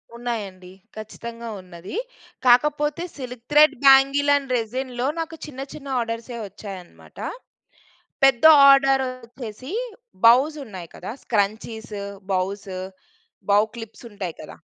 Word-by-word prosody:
ఉన్నాయండి. 205 -7 -5 0.3
ఖచ్చితంగా 230 +2 -8
ఉన్నది. 180 - -10 0.5
కాకపోతే 295 +5 +3
సిల్క్ 250 -3 -8
థ్రెడ్ 295 0 +6
బ్యాంగిల్ 275 +1 +6
అండ్ 270 -3 -2
రెసిన్‌లో 245 +2 -3
నాకు 325 0 -4
చిన్న 270 -3 -8
చిన్న 285 -2 -10
ఆర్డర్సే 230 +1 -4
వచ్చాయనమాట. 195 -2 -11 1.1
పెద్ద 270 -2 +4 0.3
ఆర్డర్ 270 -1 +5
వచ్చేసి 250 0 -9 0.5
బౌస్ 265 +7 +6
ఉన్నాయి 185 -8 -9
కదా! 185 - -7
స్క్రంచీసు 215 0 -2 0.3
బౌసు 190 0 -2 0.7
బౌ 205 +1 +6
క్లిప్స్ 225 +1 -10
ఉంటాయి 190 -5 -5
కదా! - - -11
235 Hz, 105 wpm, -23 LUFS, 205-270 Hz, 1.1 s, థ్రెడ్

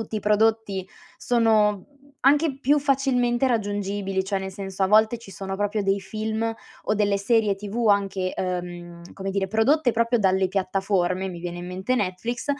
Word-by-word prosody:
tutti 220 0 -5
i - - -2
prodotti 210 -2 +1 0.3
sono 215 -4 +2 0.4
anche 285 +1 +3
più 290 +3 +3
facilmente 265 -3 +1
raggiungibili, 205 -3 -1
cioè 195 0 -2
nel 190 0 -6
senso 195 -1 -5
a 190 - +4
volte 220 +3 +4
ci 230 -3 -13
sono 195 0 -5
proprio 205 +1 -1
dei 195 0 +1
film 220 +3 -3 0.3
o 215 - 0
delle 205 -1 +2
serie 210 0 +2
TV 210 +4 -3
anche, 195 -2 +1
ehm, 175 -1 -5
come 195 0 -4
dire, 195 0 -1
prodotte 245 +6 +3
proprio 230 +1 +1
dalle 190 -2 +2
piattaforme, 190 -1 0
mi 175 -2 -7
viene 175 0 -5
in 175 - -7
mente 190 +7 -2
Netflix, 230 +3 -2
205 Hz, 165 wpm, -24 LUFS, 190-225 Hz, 0.4 s, a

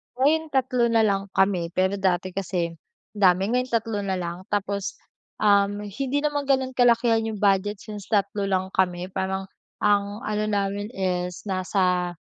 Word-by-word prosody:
Ngayon 310 +5 +2
3 255 -4 +1
na 225 -1 +3
lang 195 -1 +1
kami. 190 -3 +2
Pero 190 +2 +1
dati 185 -1 0
kasi, 180 -3 -2 0.4
dami. 195 0 +3
Ngayon 250 +1 +1
3 225 -3 -1
na 195 -2 -1
lang. 175 +1 -5
Tapos, 200 -1 -2 0.5
um, 205 0 +3
hindi 270 +8 -2
naman 290 -2 -1
ganun 265 -1 +2
kalakihan 235 -2 +4
yung 220 - -3
budget 200 +1 +2
since 210 -2 -8
3 200 -1 0
lang 190 0 -1
kami 180 0 0
parang 190 0 -2 0.4
ang 205 0 +1
ano 210 0 -1
namin 205 0 -1
is 180 -2 -2
nasa... 180 -2 0
200 Hz, 150 wpm, -24 LUFS, 190-225 Hz, 0.5 s, kalakihan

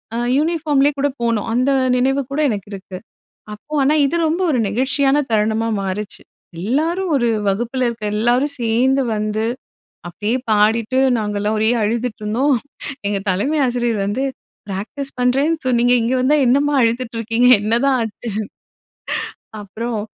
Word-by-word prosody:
அ - - -1 0.2
uniformly 300 -3 +2
கூட 285 - +2
போனோம். 230 -2 0
அந்த 255 +3 +2 0.3
நினைவு 270 +2 +1
கூட 280 - -2
எனக்கு 205 -3 -4
இருக்கு. 190 -1 -8 0.6
அப்போ 255 +9 -12
ஆனா 280 +3 +3
இது 280 - -1
ரொம்ப 330 +4 -1
ஒரு 255 - +1
நெகிழ்ச்சியான 270 +6 +1
தருணமா 220 +1 +1
மாறுச்சு. 195 +2 -4 0.4
எல்லாரும் 325 - 0
ஒரு 240 -3 +2 0.2
வகுப்புல 240 +6 -1
இருக்க 230 -2 -8
எல்லாரும் 245 +6 +1
சேர்ந்து 250 +4 +2
வந்து, 215 +1 -1 0.6
அப்படியே 205 +7 -2
பாடிட்டு 220 +3 +2 0.2
நாங்கள்லாம் 210 0 -1
ஒரே 220 +1 +2
அழுதுட்டுருந்தோம். 235 +4 0 0.5
எங்க 200 -1 -1
தலைமை 240 +12 0
ஆசிரியர் 240 -3 0
வந்து 205 +7 -1 0.4
"ப்ராக்டிஸ் 215 +9 -5
பண்றேன்னு 270 +6 +2
சொன்னீங்க. 245 0 +3
இங்க 235 +3 0
வந்தா 270 +4 +3
என்னம்மா 285 +4 +2
அழுதுட்டு 235 0 0
இருக்கீங்க? 230 +2 +2
என்னதான் 240 +5 +2
ஆச்சு?" 225 +1 -5 1.3
அப்பறம், 220 +3 -4
240 Hz, 130 wpm, -19 LUFS, 215-270 Hz, 1.3 s, ஆனா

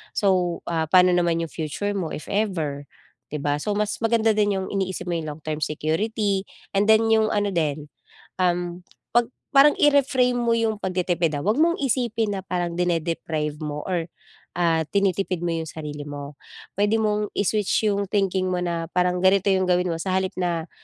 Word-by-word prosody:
So, 185 -4 +1
ah, 160 -1 0
pa'no 180 +2 +5
naman 170 -1 +1
'yong 165 - -6
future 165 +6 -3
mo, 185 -6 -3
if - - -8
ever, 165 -9 -1 0.5
'di 150 - -2
ba. 145 0 0
So 205 +5 -1
mas 210 -1 0
maganda 225 -1 +3
din 205 -2 +1
'yong 190 0 -3
iniisip 190 -2 -2
mo 175 - -1
'yong 155 -3 -4
long-term 155 0 -5
security 195 +7 -1 0.3
and 200 +2 +2
then 220 +1 +6
'yong 220 -1 +3
ano 205 -1 0
din, 155 -3 -1 0.5
um, 175 -1 -1 0.3
pag 240 0 +3 0.2
parang 280 +2 +7
i-reframe 265 -4 +3
mo 235 -1 +2
'yong 225 -2 0
pagtitipid, 175 -4 0
ah. - - -7
Huwag 210 +5 +1
mong 335 +2 +4
isipin 230 -6 0
na 190 - -7
parang 175 -2 -2
dine-deprive 165 -3 -1
mo 150 -1 -4
or, 175 -3 -2 0.5
ah, 165 -2 +2
tinitipid 195 -3 +1
mo 175 - 0
'yong 160 - -3
sarili 150 -2 -7
mo. 145 0 -7 0.4
Puwede 205 +2 +2
mong 210 -1 -1
i-switch 205 0 +1
'yong 200 0 -1
thinking 195 -2 +1
mo 180 -1 -1
na 170 -1 -2
parang 180 0 +2
ganito 190 +1 +3
'yong 190 -1 +2
gawin 180 0 +2
mo: 165 - -2
sa 185 +3 -2
halip 190 0 0
na, 170 -2 -2
185 Hz, 180 wpm, -24 LUFS, 165-205 Hz, 0.5 s, parang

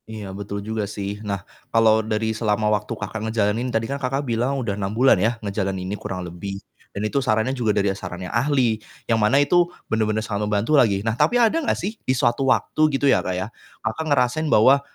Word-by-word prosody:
Iya 105 -3 -7
betul 100 0 -6
juga 110 -2 -3
sih. 100 0 -5
Nah, 100 -4 -4 0.2
kalau 110 -1 +4
dari 110 0 -1
selama 110 -1 0
waktu 105 +2 -2
Kakak 105 +1 -5
ngejalanin 110 +2 0
tadi 115 -1 0
kan 140 +3 -4
Kakak 135 +2 -1
bilang 125 +3 0
udah 115 -6 -2
6 100 -1 -3
bulan 130 +2 +6
yah 115 +3 +1
ngejalanin 95 -2 -2
ini 95 - -4
kurang 95 -3 -5
lebih, 90 +3 -6 0.3
dan 100 - -6
itu 140 +6 0
sarannya 110 +1 +1
juga 120 -4 -1
dari 100 -1 +2
saran 90 -2 -7
yang - - -7
ahli 120 -3 +1 0.2
yang 115 -2 +1
mana 105 +6 +4
itu 175 +5 +3 0.2
bener-bener 110 -1 0
sangat 105 -1 -2
membantu 105 +7 0
lagi 110 -8 +4
nah 110 - +2
tapi 240 - +3
ada 240 +8 +3
gak - - 0
sih 205 +6 -3
di - - 0
suatu 120 +3 +1
waktu 155 - 0 0.2
gitu 140 - -1
ya 135 - +4
Kak, 90 - -2
ya 95 +2 -2 0.4
Kakak 110 +9 -2
ngerasain 140 +3 +2
bahwa, 135 +6 +6
110 Hz, 215 wpm, -22 LUFS, 100-130 Hz, 0.4 s, bulan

